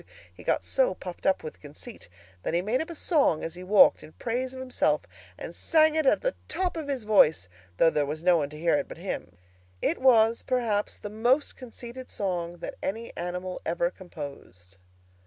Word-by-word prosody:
He - - -14
got - - 0
so - - +2
puffed 180 -1 -6
up 190 - +2
with 155 - -8
conceit 150 - -10 0.3
that 165 - -2
he 175 - +1
made 225 +6 +1
up 320 - -5
a 335 - -6
song 300 - +2
as 165 - -3
he 180 - -9
walked 200 +3 +6
in 155 - -13
praise 250 +2 -2
of 260 - -8
himself, 260 -1 +1 0.4
and - - -7
sang 315 -2 +4
it 315 -3 +1
at - - +4
the - - 0
top 365 -2 -1
of 315 -3 -4
his 270 -5 -2
voice, 180 - +4 0.3
though 165 - +5
there 150 -2 +1
was 155 +3 -4
no 180 -1 +5
one 145 -3 -1
to 150 - -10
hear 170 +1 +2
it 150 - +1
but - - -9
him. - - -5 0.4
It - - 0
was 230 -3 +5
perhaps 225 -5 0
the 205 - -7
most 245 +7 +2
conceited 250 0 -9
song 175 -3 -3
that - - -7
any 225 +4 -4
animal 180 +1 -4
ever 170 +1 0
composed. 140 - -10
205 Hz, 200 wpm, -27 LUFS, 170-255 Hz, 0.4 s, walked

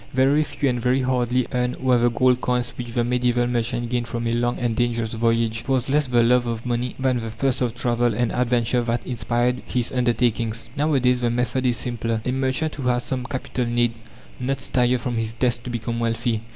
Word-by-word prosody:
Very 135 +4 +4
few 145 -1 -2
and 125 -2 0
very 125 +3 +2
hardly 125 -1 +1
earned 125 -1 0
were 130 -2 +2
the 120 +1 +4
gold 125 +1 +2
coins 125 -1 -1
which 120 - -5
the 120 - +1
medieval 120 0 +1
merchant 120 0 -1
gained 120 -1 -1
from 120 0 -3
a 115 - 0
long 120 +1 0
and 120 -2 -1
dangerous 115 -1 0
voyage. 115 0 +1
It - - -17
was 130 -1 +1
less 150 +1 +2
the 120 -1 +3
love 120 +1 +3
of 115 0 -4
money 120 0 -2
than 130 -2 +1
the 115 -1 -5
thirst 125 +4 -1
of 120 -2 0
travel 120 -2 +1
and 120 +1 0
adventure 125 0 +1
that 120 0 -2
inspired 125 0 0
his 125 -2 -1
undertakings. 120 -2 0
Nowadays 130 -4 +2
the 120 - +2
method 125 +2 0
is 120 -1 +1
simpler. 115 -2 -2
A 125 - 0
merchant 135 +4 0
who 135 -3 -4
has 125 -1 +1
some 130 -2 -3
capital 125 0 -3
need 120 0 +1 0.5
not 135 +1 -2
stir 125 0 +2
from 120 0 -3
his 110 0 -2
desk 120 0 0
to - - -4
become 115 0 -3
wealthy. 115 -1 -1
120 Hz, 215 wpm, -23 LUFS, 115-125 Hz, 0.5 s, Very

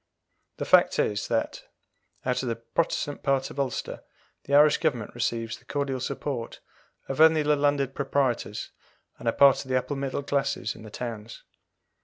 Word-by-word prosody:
The - - -3
fact - - +5
is, 105 -1 0
that, - - -1 0.6
out 125 -1 0
of 130 - -3
the 115 - -1
Protestant 145 +4 -2
part 135 -1 0
of - - -8
Ulster, 135 -3 -3 0.4
the 140 - +1
Irish 150 +1 +6
Government 130 -10 -1
receives 115 -1 -2
the 125 - -26
cordial 140 -1 -2
support 125 -1 -4 0.5
of 135 +3 -1
only 160 -1 +6
the 150 0 +3
landed 140 -2 +1
proprietors, 135 -7 -1 0.5
and 120 - -7
a - - +4
part 140 +2 +5
of 130 - -14
the 130 - +2
upper 135 +3 -2
middle 135 0 -3
classes 140 -5 -1
in - - -14
the 110 - -10
towns. 115 -1 -7
135 Hz, 170 wpm, -26 LUFS, 120-145 Hz, 0.6 s, Irish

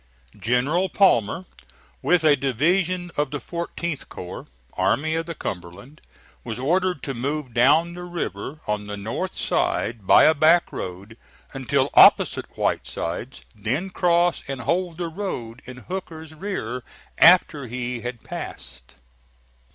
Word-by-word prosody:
General 140 - +1
Palmer, 175 - +2 0.6
with 180 -2 +3
a 150 -2 +6
division 175 - 0
of 145 -1 +1
the 145 - -4
14th 170 -2 -5
corps, 90 0 -8 0.3
Army 140 +12 +1
of 165 0 -2
the 170 - -5
Cumberland, 95 - -7 0.4
was 115 -2 -5
ordered 180 +5 0
to 135 - -3
move 135 +1 -3
down 145 +8 +4
the 175 - -8
river 155 - -5
on 105 0 -2
the 105 0 -6
north 115 - -4
side, 110 -4 -1
by - - +7
a 155 - +6
back 160 +3 +4
road, 100 +5 -7 0.3
until 135 +1 0
opposite - - +6
Whitesides, 90 +10 -3
then 125 - -3
cross 175 -1 +2
and 135 -1 -4
hold 170 +5 -1
the 175 -1 -3
road 145 - -5
in 125 0 -9
Hooker's 160 0 -7
rear 155 - -4 0.4
after 170 -6 +5
he 125 0 -4
had 120 -1 -6
passed. - - -8
145 Hz, 135 wpm, -23 LUFS, 120-170 Hz, 0.6 s, by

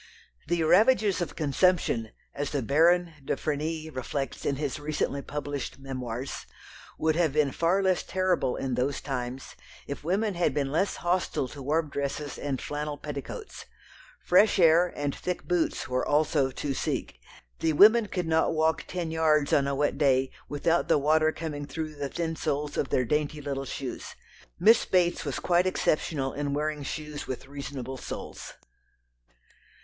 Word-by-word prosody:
The 170 0 +1
ravages 205 +3 +4
of 175 - -3
consumption, 150 - +1 0.2
as 145 0 -3
the 140 -4 -2
Baron 165 +6 +3
de - - -1
Frenilly 155 +1 -3
reflects 135 0 -4
in 140 - +1
his 145 0 -3
recently 145 -1 -2
published 145 -1 -5
memoirs, 130 -2 -5 0.5
would 160 0 +1
have 165 -4 +2
been 150 -2 +2
far 175 +6 +1
less 185 -1 +2
terrible 185 -8 0
in 135 -2 -2
those 130 +3 0
times 130 -1 -5 0.3
if 140 - -6
women 200 +6 0
had 170 -6 0
been 140 -2 0
less 170 +7 +1
hostile 175 -6 0
to 145 - -9
warm 150 +2 0
dresses 140 0 -3
and 140 -3 -2
flannel 150 0 -4
petticoats. 150 - -7 0.5
Fresh 200 +5 +4
air 170 0 +5
and 145 -1 -2
thick 180 -1 -3
boots 175 -4 0
were 130 0 0
also 145 -2 +2
to 140 +2 -3
seek. - - -3 0.4
The 160 - +1
women 215 +6 +7
could 180 -3 -2
not 160 0 +2
walk 160 +1 +1
ten 175 -3 -3
yards 155 -3 +2
on 140 -1 +4
a 140 - 0
wet 145 0 0
day 135 -2 +3 0.2
without 165 +4 +1
the - - +4
water 155 +2 +3
coming 150 -3 -5
through 155 +2 -5
the 145 -2 -4
thin 165 0 -2
soles 145 -1 -2
of 135 - -1
their 125 - +1
dainty 150 +3 0
little 140 -1 -4
shoes. 135 -1 -6 0.4
Miss 220 +6 +6
Bates 175 -2 +1
was - - -2
quite 180 +1 +2
exceptional 155 -6 0
in 145 -1 -2
wearing 150 0 -1
shoes 150 +1 -5
with 130 -1 -5
reasonable 135 -2 -6
soles. - - -7
150 Hz, 160 wpm, -28 LUFS, 140-170 Hz, 0.5 s, women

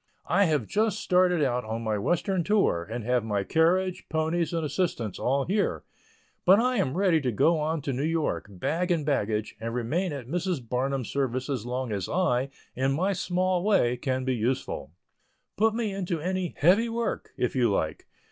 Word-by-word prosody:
I 200 +4 +3
have 155 -4 +1
just 215 0 0
started 180 -3 +3
out 125 -2 0
on 110 +1 -4
my 110 -2 -1
western 175 - 0
tour, 195 - +1
and 115 +1 -4
have 125 0 +1
my 105 -3 -1
carriage, 180 - +1
ponies 160 +1 0
and 165 -2 -1
assistants 140 - -2
all 135 +2 +1
here, 200 +2 0 0.6
but 190 +3 +6
I 250 +1 +1
am 145 -6 0
ready 185 -5 +3
to 130 -2 0
go 160 +9 +3
on 155 -1 -1
to 140 - -2
New 125 - -2
York, 160 -4 -1
bag 160 - -2
and 165 -4 +1
baggage, 110 -7 -1
and 115 +1 -4
remain 155 +10 -1
at 140 -4 -5
Mrs. 170 -4 -2
Barnum's 130 +1 -1
service 130 0 -1
as 120 -4 -3
long 125 -1 -3
as 100 -4 -3
I, 140 -8 +1 0.3
in 135 +2 +1
my 185 +7 +1
small 180 0 0
way, 190 - +3
can 130 0 -2
be 130 - +1
useful. 120 - -2 0.7
Put 220 +1 +2
me 225 -4 -1
into 180 -4 -2
any 185 +1 -2
"heavy" 200 +10 +4
work, 230 0 -2
if 125 - -1
you 120 -3 +3
like. 80 -5 -2
150 Hz, 185 wpm, -27 LUFS, 125-180 Hz, 0.7 s, but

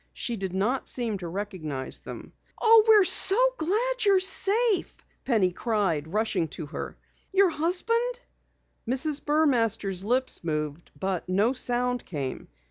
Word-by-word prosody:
She 240 - -3
did 190 -3 -5
not 210 +8 -1
seem 230 -5 -3
to 175 - -7
recognize 165 -8 -5
them. - - -11 0.3
"Oh, 450 -1 +6
we're 430 -2 +6
so 385 +2 +7 0.2
glad 460 +9 -1
you're 400 -2 +4
safe!" 395 +2 +1 0.3
Penny 215 -8 +1
cried, 190 -8 -2
rushing 205 -5 -1
to 160 - -6
her. 145 - -7 0.3
"Your 385 -2 +3
husband?" 460 +10 0 0.7
Mrs. 280 +4 0
Burmaster's 230 - 0
lips 250 +2 -1
moved, 150 0 -4
but 190 -2 -3
no 205 +7 +1
sound 245 -1 0
came. 140 -6 -6
240 Hz, 130 wpm, -26 LUFS, -, 0.7 s, so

